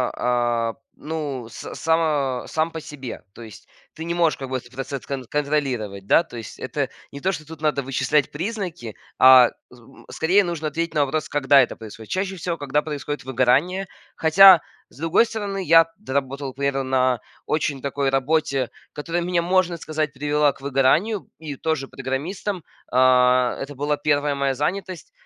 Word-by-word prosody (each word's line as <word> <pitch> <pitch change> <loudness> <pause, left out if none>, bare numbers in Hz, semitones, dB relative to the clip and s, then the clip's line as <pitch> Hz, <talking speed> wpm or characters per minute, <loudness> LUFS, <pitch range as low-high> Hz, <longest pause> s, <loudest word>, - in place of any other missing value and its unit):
а, 120 -2 0 0.2
ну, 145 -6 -5
с - - -8
са 150 -6 0
сам 160 +1 -1
по 165 - -5
себе. 135 -5 -8
То - - -13
есть 110 -1 -12 0.3
ты 160 - -7
не 170 - -2
можешь 170 -2 +2
как 135 -1 -7
бы 130 - -1
этот 120 -1 -12
процесс 135 +1 -5
кон 135 -2 -4
контролировать, 130 -10 -2
да. 165 - +5
То 125 -8 -11
есть 110 - -9
это - - -2 0.2
не 140 - -8
то, 190 +5 0
что 155 -4 -6
тут 160 -1 -11
надо 150 -3 +1
вычислять 135 +2 0
признаки, 175 - -5 0.2
а 130 -1 +8 0.2
з 125 - -16
м, 135 +4 -18
скорее 185 +5 +3
нужно 170 -3 -3
ответить 165 +3 -3
на 145 -2 +3
вопрос, 155 +3 -3
когда 140 -1 +5
это 125 - -1
происходит. 110 0 -11
Чаще 190 +1 -1
всего, 170 -1 -3
когда 145 0 0
происходит 145 -3 -5
выгорание. 135 +10 +1 0.3
Хотя, 180 +2 +8 0.3
с - - -20
другой 165 +8 +3
стороны, 205 -4 -4
я 165 +1 +6
доработал 140 -6 -3
примерно 140 0 -1
на 130 -2 +1 0.3
очень 145 -3 -1
такой 140 0 -1
работе, 135 -1 0 0.2
которая 170 +3 -3
мне, 175 0 +1
можно 180 0 +1
сказать, 155 -2 -3
привела 145 +1 +1
к - - -18
выгоранию 140 - +1
и 150 -3 -6
тоже 155 -2 -2
программистом. 165 +8 -4 0.3
А, 125 0 +4
это 135 +1 -6
была 145 +2 -1
1 145 -1 +1
моя 140 -1 0
занятость, 180 +5 -3
145 Hz, 170 wpm, -23 LUFS, 130-165 Hz, 0.3 s, а